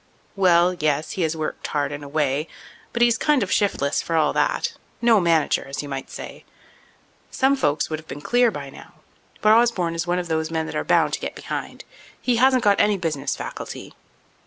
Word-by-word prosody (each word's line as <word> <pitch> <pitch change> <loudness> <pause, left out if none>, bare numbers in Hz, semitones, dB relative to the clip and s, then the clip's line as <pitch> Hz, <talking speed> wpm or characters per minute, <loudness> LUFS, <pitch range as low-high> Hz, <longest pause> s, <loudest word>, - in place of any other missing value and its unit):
"Well, 180 -2 +4
yes, 155 -2 -1
he 190 - -3
has 160 -1 0
worked 155 - -4
hard 145 -1 -1
in 145 0 -6
a - - -8
way. 145 0 0 0.4
But 235 - +2
he's 235 -2 +3
kind 295 -6 +2
of 190 - -5
shiftless, 140 -9 +1
for 165 - -3
all 155 -2 +2
that—no 235 - +1
manager, 165 -3 +2
as 135 +2 -5
you 145 - -8
might 135 -1 -5
say. - - -9 0.9
Some 270 +1 +2
folks 145 - 0
would 155 - -2
have 160 - -16
been - - -7
clear 245 +9 +3
by 140 -9 -7
now, - - -14 0.5
but 215 - +5
Osborne 225 -8 +2
is 165 +1 -3
one 175 +1 +1
of 180 -1 -3
those 160 -1 -1
men 160 -1 -2
that - - -6
are - - -1
bound - - +2
to - - -1
get - - -5
behind. - - -6 0.4
He 245 -2 +1
hasn't 255 0 +4
got 205 -1 +4
any 205 -1 +3
business 160 -6 -2
faculty." - - -7
170 Hz, 205 wpm, -23 LUFS, 150-215 Hz, 0.9 s, but